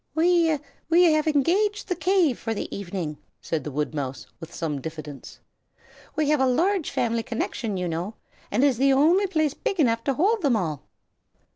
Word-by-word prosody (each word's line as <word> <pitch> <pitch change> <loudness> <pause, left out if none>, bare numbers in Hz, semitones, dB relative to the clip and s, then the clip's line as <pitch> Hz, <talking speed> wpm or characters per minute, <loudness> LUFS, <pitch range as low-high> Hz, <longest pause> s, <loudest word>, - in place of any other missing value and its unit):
"We 330 -1 +3 0.3
we 340 +2 +5
have 310 0 +1
engaged 370 +9 +1
the 365 - -1
cave 340 - +2
for 225 -1 -3
the - - -5
evening," 175 -6 -5 0.2
said 160 -2 -3
the - - -5
woodmouse, 145 -2 -3
with 165 - -9
some 150 -4 -3
diffidence. 155 -3 -8 0.8
"We 305 -2 +1
have 300 -1 +3
a 265 - +4
large 345 +7 +1
family 230 -1 0
connection, 225 -2 -3
you 180 -1 -2
know, 175 +6 -4 0.3
and 260 - +1
it - - +6
is 260 -4 +1
the 275 0 +4
only 335 +9 +4
place 315 -5 0
big 395 +1 -3
enough 230 -5 +2
to 275 - +1
hold 415 - +2
them 280 -7 +2
all." 160 -9 -2
265 Hz, 180 wpm, -25 LUFS, -, 0.8 s, it